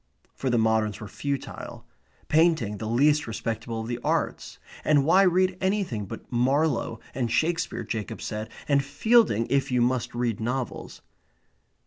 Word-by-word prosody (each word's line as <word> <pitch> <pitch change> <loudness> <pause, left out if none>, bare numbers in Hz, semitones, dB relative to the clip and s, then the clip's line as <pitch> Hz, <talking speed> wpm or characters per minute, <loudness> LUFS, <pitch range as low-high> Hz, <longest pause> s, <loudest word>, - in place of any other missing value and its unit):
For 135 - -3
the 120 - +2
moderns 110 -2 +1
were 110 - -7
futile; 140 +6 -5 0.4
painting 155 -10 +2
the 110 - -4
least 145 +6 +3
respectable 115 0 -4
of 110 - -6
the 120 0 -3
arts; - - -1 0.3
and 145 -3 +3
why 180 +5 +5
read 185 0 +3
anything 190 - -1
but - - -9
Marlowe 130 -1 +1
and 120 -3 -2
Shakespeare, 165 +7 0
Jacob 110 -3 -4
said, 110 0 -5 0.2
and 140 -1 +3
Fielding 145 - +3
if 135 -1 +1
you 125 - +2
must 120 0 0
read 120 -3 -1
novels? 125 +2 -4
125 Hz, 145 wpm, -26 LUFS, 115-155 Hz, 0.4 s, why